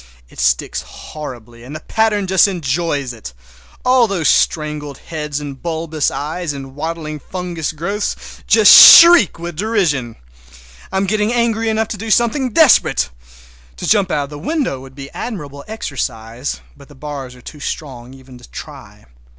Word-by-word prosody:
It -, -, -14 dB
sticks -, -, 0 dB
horribly 120 Hz, -6 st, -10 dB
and 135 Hz, +5 st, -9 dB
the -, -, -6 dB
pattern 210 Hz, +2 st, 0 dB
just 190 Hz, +1 st, +4 dB
enjoys 155 Hz, -6 st, -2 dB
it! 105 Hz, -, -10 dB, 0.5 s
All 250 Hz, -2 st, +4 dB
those 185 Hz, -6 st, 0 dB
strangled 150 Hz, -2 st, 0 dB
heads 150 Hz, -3 st, -5 dB
and 140 Hz, -3 st, -8 dB
bulbous 160 Hz, -2 st, -2 dB
eyes 155 Hz, +2 st, -4 dB
and 135 Hz, -1 st, -9 dB
waddling 155 Hz, 0 st, -5 dB
fungus 175 Hz, -1 st, -5 dB
growths 195 Hz, +7 st, -3 dB, 0.3 s
just -, -, +7 dB
shriek 335 Hz, -, +9 dB
with 170 Hz, 0 st, -7 dB
derision! 165 Hz, -, -1 dB, 0.8 s
I -, -, -2 dB
am 195 Hz, -, +1 dB
getting 210 Hz, +2 st, 0 dB
angry 230 Hz, -2 st, 0 dB
enough 220 Hz, 0 st, -1 dB
to 215 Hz, -, -5 dB
do 225 Hz, +3 st, -6 dB
something 240 Hz, +5 st, +1 dB
desperate. 215 Hz, -, +3 dB, 0.6 s
To -, -, -6 dB
jump 200 Hz, -3 st, +2 dB
out 150 Hz, -4 st, 0 dB
of 140 Hz, -, -9 dB
the 145 Hz, -, -8 dB
window 275 Hz, -, -2 dB
would 135 Hz, 0 st, -14 dB
be 140 Hz, 0 st, -10 dB
admirable 145 Hz, -, -7 dB
exercise, 125 Hz, -, -5 dB
but 140 Hz, -1 st, -17 dB
the 145 Hz, -, -17 dB
bars 135 Hz, -2 st, -8 dB
are 125 Hz, -, -16 dB
too 150 Hz, -, -11 dB
strong 130 Hz, -4 st, -7 dB
even 130 Hz, -2 st, -15 dB
to -, -, -16 dB
try. -, -, -11 dB
155 Hz, 160 wpm, -17 LUFS, 135-205 Hz, 0.8 s, shriek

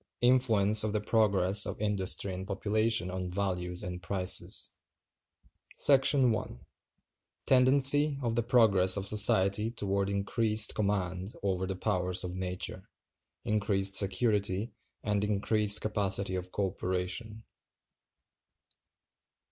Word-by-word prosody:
Influence 110 Hz, -5 st, +3 dB
Of 110 Hz, -1 st, -3 dB
The 105 Hz, -, 0 dB
Progress 100 Hz, -3 st, +2 dB
Of -, -, -7 dB
Industry 100 Hz, -2 st, -1 dB
And 95 Hz, +1 st, -7 dB
Population 105 Hz, 0 st, -1 dB
On 90 Hz, -1 st, -5 dB
Values 90 Hz, -2 st, -4 dB
And 90 Hz, 0 st, -7 dB
Prices. 95 Hz, -1 st, 0 dB, 1.1 s
§ 135 Hz, -2 st, +5 dB
1. 65 Hz, -, -6 dB, 0.9 s
Tendency 140 Hz, +3 st, +4 dB
of 115 Hz, -2 st, -2 dB
the 120 Hz, -, 0 dB
progress 110 Hz, -6 st, +3 dB
of 95 Hz, -, -3 dB
society 100 Hz, 0 st, +3 dB
toward 100 Hz, -3 st, -3 dB
increased 105 Hz, +2 st, 0 dB
Command 95 Hz, -2 st, -3 dB
over 95 Hz, -1 st, -2 dB
the 95 Hz, -, -5 dB
powers 90 Hz, -2 st, -1 dB
of 90 Hz, 0 st, -6 dB
Nature; 90 Hz, -1 st, -6 dB, 0.6 s
increased 100 Hz, -2 st, -2 dB
Security, 100 Hz, +1 st, 0 dB, 0.3 s
and 105 Hz, -3 st, -2 dB
increased 105 Hz, 0 st, +1 dB
Capacity 100 Hz, -2 st, -1 dB
of 90 Hz, 0 st, -6 dB
Co 100 Hz, -, -2 dB
Operation. 95 Hz, +4 st, -5 dB
100 Hz, 110 wpm, -29 LUFS, 95-110 Hz, 1.1 s, §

